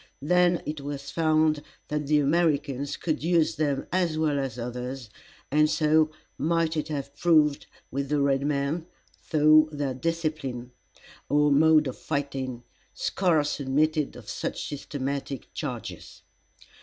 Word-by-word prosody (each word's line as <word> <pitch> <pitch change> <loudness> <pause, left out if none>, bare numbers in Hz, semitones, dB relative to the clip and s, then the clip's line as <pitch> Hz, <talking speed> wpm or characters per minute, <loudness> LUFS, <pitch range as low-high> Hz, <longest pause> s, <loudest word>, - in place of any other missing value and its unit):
Then 180 +2 +3
it 150 -1 -4
was 140 0 -6
found 155 -2 +2 0.3
that 150 -1 -2
the 150 +1 +4
Americans 145 -2 +1
could 155 -3 -2
use 165 -2 +2
them 145 -3 0
as 175 -3 +1
well 150 -3 +1
as 135 -3 -3
others, 125 0 -5 0.4
and 150 +1 +4
so 155 0 +3 0.3
might 165 +1 +1
it 155 -1 -2
have 140 -2 -5
proved 150 -3 +3 0.2
with 140 +1 -3
the 150 -1 +1
red 140 -1 +2
men, 145 +3 -1 0.4
though 155 0 +5
their 145 -3 -2
discipline, 150 -5 -3 0.6
or 150 0 +3
mode 155 +1 +5
of 130 - -5
fighting, 135 -4 -3 0.3
scarce 160 -7 +1
admitted 150 +2 +1
of - - -12
such - - -4
systematic 140 -2 -5
charges. - - -6
150 Hz, 130 wpm, -27 LUFS, 140-155 Hz, 0.6 s, though